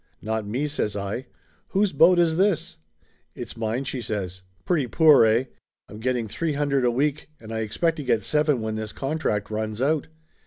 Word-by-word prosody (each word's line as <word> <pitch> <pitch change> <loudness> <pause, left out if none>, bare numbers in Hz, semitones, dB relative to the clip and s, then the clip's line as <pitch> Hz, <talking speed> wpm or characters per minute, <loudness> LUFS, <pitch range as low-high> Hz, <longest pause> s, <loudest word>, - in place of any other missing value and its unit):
"Not 110 -1 -3
me," 125 +8 -1
says 140 -8 -2
I. 105 +6 -4 0.4
"Whose 195 -2 +1
boat 165 +5 +6
is 165 -2 +3
this?" 185 - +1 0.6
"It's - - -7
mine," 115 +3 -2
she 130 -1 -4
says. 95 -5 -4 0.2
"Pretty 155 -8 +1
poor, 155 -4 +6
eh? 110 +3 +3 0.4
I'm 105 - -10
get 130 +3 0
ting 120 -3 -2
three 150 +9 -2
hundred 140 -2 +1
a - - +4
week 145 +5 -1
and 110 0 -10
I 110 - -2
expect 160 +10 0
to 150 - -4
get 115 -5 +1
seven 150 0 +1
when 110 0 -3
this 110 -1 -5
contract 135 -8 -2
runs 110 0 -3
out." 150 +4 +1
125 Hz, 190 wpm, -24 LUFS, 110-150 Hz, 0.6 s, boat